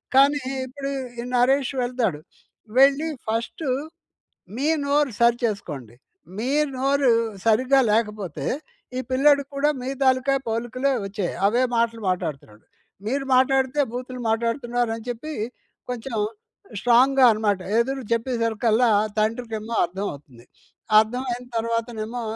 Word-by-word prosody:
కానీ 280 +2 +5 0.2
ఇప్పుడు 275 +2 -5 0.3
ఈ - - -6
'నరేష్' 260 +2 +2
వెళ్తాడు. 240 -10 -1 0.6
వెళ్ళి 280 +3 +5 0.2
ఫస్టు, 230 +7 -2 0.9
మీ 280 +4 0 0.2
నోరు 285 -1 +2
సరి 235 0 +5
చేసుకోండి. 150 - -5 0.4
మీ 235 +4 -2 0.3
నోరు 275 0 +2 0.3
సరిగ్గా 255 +5 +4
లేకపోతే 210 -9 -1 0.5
ఈ - - 0
పిల్లోడికి 280 +1 +4
కూడా 285 +2 +2
మీ 255 - -4
తాలుకా 260 +1 +3
పోలికలే 240 +4 -1
వచ్చాయి 195 -2 -3
అవే 235 +5 +2 0.2
మాటలు 230 -1 0
మాట్లాడుతున్నాడు. 135 -11 -4 0.4
మీరు 270 +4 -1
మాట్లాడితే 265 +2 +3
బూతులు 250 0 -6
మాట్లాడుతున్నారు 235 +1 0
అని 225 - -11
చెప్పి 245 +6 -5 0.6
కొంచెం 240 -1 -5 0.6
స్ట్రాంగ్‌గా 255 +3 +5
అనమాట, 210 -2 0 0.2
ఎదురు 265 +3 -1
చెప్పేసరికల్లా 230 -1 +1 0.3
తండ్రికేమో 225 0 -2
అర్థం 190 +4 -5
అవుతుంది. 130 -4 -15 0.5
అర్థం 235 +4 0
అయిన 245 +1 -5
తర్వాతనేమో 230 0 -2
240 Hz, 115 wpm, -23 LUFS, 220-265 Hz, 0.9 s, కానీ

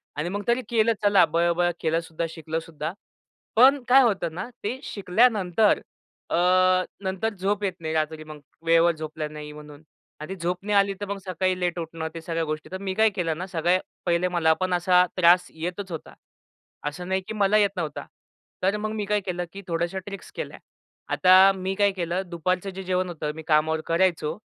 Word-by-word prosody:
आणि 150 +4 -2
मग 205 +2 -3
तरी 240 +2 +2
केलं 230 -1 +3
चला 205 -2 +6
बरोबर 170 +2 +1
केलं 165 0 +1
सुद्धा, 165 0 -4
शिकलं 160 0 -4
सुद्धा. 160 -1 -6 0.6
पण 265 +4 +6
काय 265 +2 +7
होतं 190 -8 0
ना 190 +6 -5
ते 240 +6 -3
शिकल्यानंतर 205 0 +2 0.5
अ, - - 0 0.7
नंतर 190 +4 -2
झोप 200 +2 0
येत 195 -2 0
नाही 160 -1 -4
रात्री, 155 0 -1
मग 155 -1 -10 0.3
वेळेवर 165 +1 +5
झोपलो 155 0 -5
नाही 150 0 -8
म्हणून. 150 0 -12 0.4
आणि 155 +5 -6
ती - - -7
झोप 175 +2 -1
नाही 210 0 0
आली 200 0 +3
तर - - -2
मग 200 0 -3
सकाळी 185 0 -1
लेट 175 -1 -1
उठणं 165 -1 -5
ते 165 - -7
सगळ्या 165 0 -2
गोष्टी. 155 -1 -4
तर 185 - -3
मी 190 -1 -2
काय 220 +3 +4
केलं 175 -6 -2
ना 180 - -4
सगळ्यात 180 +1 +1 0.2
पहिले 175 0 +2
मला 170 -3 +3
पण 185 -1 0
असा 180 +1 +4
त्रास 180 0 +5
येतच 180 +4 -5
होता, 160 - -7 0.8
असं 180 +4 -8
नाही 190 0 +1
की - - -4
मला 205 0 +3
येत 205 -1 +4
नव्हता. 155 -4 -4 0.6
तर 195 +3 +2
मग 215 0 -3
मी 210 -1 -3
काय 210 +1 +1
केलं, 180 -2 -3
की 200 - -8
थोड्याश्या 170 +2 -1
ट्रिक्स 195 -1 -9
केल्या. - - -6 0.6
आता 185 +1 +7
मी 190 0 -3
काय 200 0 +3
केलं 180 -1 -2
दुपारचं 185 +3 -1
जे 190 0 -7
जेवण 185 0 -1
होतं 155 -3 -4
मी 160 - -7
कामावर 155 0 +2
करायचो 165 -2 +1
180 Hz, 195 wpm, -25 LUFS, 165-195 Hz, 0.8 s, काय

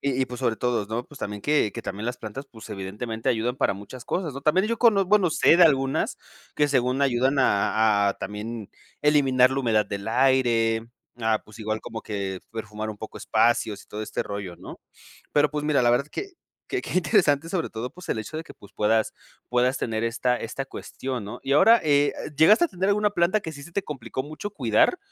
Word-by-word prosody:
Y 135 -2 0
y - - -1
pues 125 0 -8
sobre 120 -4 0
todo, 120 -4 -1
¿no?, 115 +3 -3
pues, 150 - -13
también 105 0 -5
que 145 -8 +2
que - - -6
también 105 +4 -5
las 125 - -2
plantas, 120 +6 -7
pues, 110 -2 -12
evidentemente, 105 +4 -4
ayudan 120 +2 0
para 100 - +1
muchas 105 +5 -10
cosas, 175 -6 -2
¿no? 140 - -7
También 160 +8 +2
yo 230 0 -2
cono 210 -5 +4
bueno, 195 -1 +3
sé 160 - +5
de - - +8
algunas, 135 -4 +2 0.4
que 150 -1 +2
según 130 0 +1
ayudan 135 +1 +2
a 105 -3 +3
a - - -1
también 105 +1 -6 0.3
eliminar 135 -4 +4
la 135 +1 -1
humedad 110 -4 +2
del 100 +2 -5
aire, 115 -3 +2 0.3
ah, 110 -1 +1
pues, 110 +1 -15
igual 110 0 -3
como 115 -1 -6
que 100 -3 -4
perfumar 110 -1 -5
un 110 - -5
poco 110 - -8
espacios 110 -2 +1
y - - -22
todo 105 - -6
este - - -3
rollo, 100 -4 -6
¿no? - - -11 0.5
Pero, 145 -1 +3
pues, 150 0 -3
mira, 145 -4 +3
la 120 - +4
verdad 125 +4 +2
que 395 - -5 0.4
que 390 - -2
qué - - -7
interesante, 165 -3 +2
sobre 175 -3 -1
todo, 115 +3 -5
pues, 180 +5 -13
el - - -1
hecho 110 +9 -5
de - - -4
que, - - -13
pues, 100 0 -17
puedas 110 +2 +1 0.4
puedas 125 +1 +2
tener 110 -1 -2
esta 125 +1 0
esta 130 +4 -5
cuestión, 130 -2 -6
¿no? 105 - -7
Y 135 - -1
ahora, 225 +11 +7
eh 145 -1 +3
eh, - - -7
¿llegaste 210 - +6
a - - -18
tener 190 - -2
alguna 210 0 +2
planta 185 +3 +2
que 160 - -6
sí 140 -2 -10
se 170 +4 -12
te 200 - -1
complicó 130 -4 -5
mucho 155 +8 -7
cuidar? 130 - +2
125 Hz, 220 wpm, -25 LUFS, 110-150 Hz, 0.5 s, de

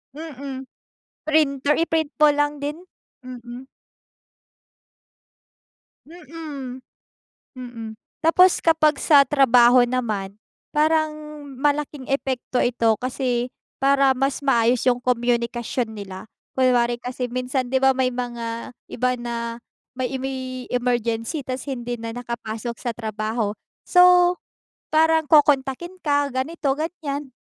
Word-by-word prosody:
Mm. 280 -4 -7 0.6
Printer, 295 -2 +2
i-print 320 -2 0
po 300 -1 +6
lang 290 0 0
din, 295 +3 -3 0.5
mm. 245 +1 -9 2.4
Mm. 295 -6 -8 0.7
Mm, 240 -3 -8 0.3
tapos 360 +3 +5
kapag 315 -2 +3
sa 290 -3 +6
trabaho 250 -3 +5
naman 215 -6 -2 0.4
parang 310 0 +2 0.5
malaking 290 -2 -1
epekto 260 -2 -2
ito 230 -3 +2
kasi, 250 -1 -2 0.2
para 275 -1 +3
mas 270 +1 0
maayos 240 -3 +2
yung 245 - +2
komyunikasyon 240 -1 -1
nila. 195 -2 -8 0.3
Kunwari 240 -2 +3
kasi 250 0 -5
minsan 255 0 -2
'di 265 - +2
ba 265 0 +6
may 260 -1 +1
mga 240 -1 -5 0.2
iba 250 +1 0
na 240 0 -4 0.6
may 255 -1 -2
may 260 -1 -5
emergency 240 +3 -1
ta's 255 +2 -5
hindi 245 -2 -4
na 230 - -4
nakapasok 235 -1 -5
sa 245 - -3
trabaho, 215 -1 -2 0.3
so 360 0 +6 0.6
parang 320 0 +4
kokontakin 295 +3 +2
ka 285 -1 +2
ganito-ganyan. 290 +1 -3
260 Hz, 105 wpm, -22 LUFS, 240-290 Hz, 2.4 s, po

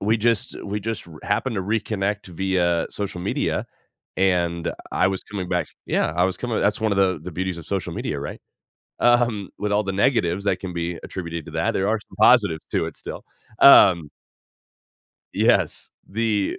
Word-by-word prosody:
We 110 +3 +2
just 115 +2 0
we 105 +1 -3
just 110 -1 -4
r 80 -2 -12
happened 130 -3 -1
to 95 - -1
reconnect 105 -1 -2
via 90 -1 0
social 100 -3 -4
media, 95 - -1 0.5
and 85 -3 +1 0.2
I - - +3
was 95 -1 -3
coming 95 -4 -5
back 90 -1 -1 0.2
Yeah. 75 - +1
I 90 - +4
was 95 - 0
coming 120 -3 -2
that's 105 +3 +1
one 110 0 +1
of 100 - 0
the 95 -1 +2
the 90 - -6
beauties 95 +1 -3
of 80 - -10
social 95 -2 -3
media, - - -3
right? - - -6 0.6
Um. 120 -5 +3
With 105 0 -2
all 105 +1 +2
the 95 - -2
negatives 100 -3 +1
that 100 -2 +2
can 95 -2 -5
be 85 0 -3
attributed 85 -3 -6
to - - -8
that, - - 0
there 95 +1 0
are 110 +1 +1
some - - -17
positives 105 -8 +5
to - - +1
it - - -8
still, - - -8 0.4
um 85 - +7 1.2
Yes. - - +1 0.2
The 105 -1 0
95 Hz, 185 wpm, -23 LUFS, 90-105 Hz, 1.2 s, um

